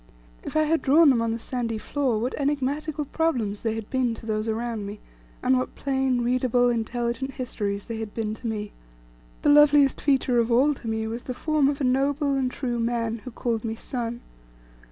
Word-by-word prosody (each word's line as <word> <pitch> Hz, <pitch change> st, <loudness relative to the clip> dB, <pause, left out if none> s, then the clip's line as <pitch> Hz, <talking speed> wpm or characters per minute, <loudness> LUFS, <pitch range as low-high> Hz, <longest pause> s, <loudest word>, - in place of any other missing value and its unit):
If -, -, -8 dB
I 310 Hz, -, +4 dB
had 320 Hz, +1 st, +1 dB
drawn 295 Hz, +2 st, +6 dB
them 235 Hz, -3 st, +2 dB
on 230 Hz, -, 0 dB
the 225 Hz, -, -1 dB
sandy 230 Hz, -1 st, -3 dB
floor, 260 Hz, 0 st, -1 dB
what 240 Hz, +4 st, -2 dB
enigmatical 290 Hz, +2 st, -1 dB
problems 250 Hz, -10 st, -1 dB
they 225 Hz, -1 st, -1 dB
had 225 Hz, -2 st, -5 dB
been 255 Hz, -3 st, +1 dB
to 225 Hz, -, -12 dB
those 215 Hz, 0 st, -1 dB
around 225 Hz, -2 st, -2 dB
me, 205 Hz, +1 st, -7 dB, 0.4 s
and 260 Hz, +1 st, +4 dB
what 255 Hz, -, -4 dB
plain, 265 Hz, -2 st, 0 dB
readable, 245 Hz, 0 st, +2 dB
intelligent 240 Hz, +3 st, -2 dB
histories 205 Hz, -6 st, -3 dB
they 230 Hz, -2 st, -5 dB
had 220 Hz, -2 st, -5 dB
been 215 Hz, -1 st, -3 dB
to 230 Hz, -, -6 dB
me! 210 Hz, -2 st, -3 dB, 0.7 s
The -, -, +4 dB
loveliest 290 Hz, -1 st, +6 dB
feature 265 Hz, -4 st, +2 dB
of 230 Hz, +1 st, +1 dB
all 270 Hz, +5 st, +4 dB
to 255 Hz, -, -10 dB
me 220 Hz, 0 st, -1 dB
was 230 Hz, +2 st, -5 dB
the 255 Hz, -, -4 dB
form 305 Hz, 0 st, +2 dB
of 285 Hz, -, -2 dB
a -, -, -2 dB
noble, 280 Hz, +3 st, +1 dB
and 265 Hz, -2 st, +1 dB
true 245 Hz, -2 st, -3 dB
man, 230 Hz, -1 st, -1 dB
who 255 Hz, -, -8 dB
called 230 Hz, -2 st, -2 dB
me 225 Hz, -1 st, -3 dB
son. 240 Hz, 0 st, -4 dB
245 Hz, 200 wpm, -25 LUFS, 225-275 Hz, 0.7 s, drawn